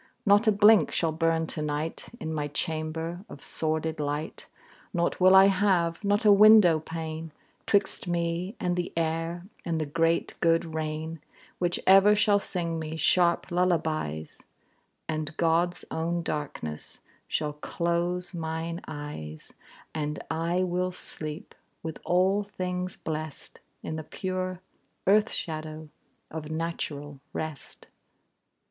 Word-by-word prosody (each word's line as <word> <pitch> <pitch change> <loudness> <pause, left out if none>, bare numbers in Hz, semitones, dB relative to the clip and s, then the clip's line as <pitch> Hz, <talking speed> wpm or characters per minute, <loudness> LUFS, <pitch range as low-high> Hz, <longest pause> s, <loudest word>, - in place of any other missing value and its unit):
Not 205 +2 +5
a - - +7
blink 205 -4 +6
shall 165 -2 +1
burn 165 0 +1
to 155 - -4
night 150 +2 -3
In 160 0 -4
my 150 -2 -1
chamber, 160 +3 -3
of 140 - -10
sordid 160 0 -1
light; 150 +1 -3 0.5
Nought 170 0 0
will 185 +1 +7
I 190 0 +9
have, 185 -3 +2
not 205 +2 +1
a 210 - +8
window 200 -5 +8
pane, 160 0 -6 0.4
'Twixt 200 -2 +1
me 175 +4 -1
and 180 -1 0
the 175 0 -2
air 165 +2 -1 0.2
and 165 -2 -1
the 155 - -1
great 165 +3 +1
good 165 -1 +2
rain, 155 0 -4 0.4
Which 175 -1 0
ever 195 +2 +7
shall 205 -1 +4
sing 170 -4 -2
me 160 0 -5
sharp 170 +3 +3
lullabies; 160 - -1 0.6
And 155 -1 -3
God's 170 +1 +1
own 170 +1 -1
darkness 140 - -5 0.3
shall 150 -1 -1
close 170 +4 -2
mine 165 0 -3
eyes; 145 - -7 0.4
And 150 -1 -2
I 170 +3 0
will 180 0 0
sleep, 160 0 -5 0.3
with 160 -1 -5
all 190 +3 +3
things 185 -2 -4
blest, 155 -2 -6 0.2
In 155 - -4
the 160 - -5
pure 185 +2 -4 0.4
earth 210 +3 +4
shadow 155 -1 -5 0.4
of 155 -1 -6
natural 150 -3 -4
rest. 155 -2 -6
165 Hz, 130 wpm, -28 LUFS, 155-180 Hz, 0.6 s, I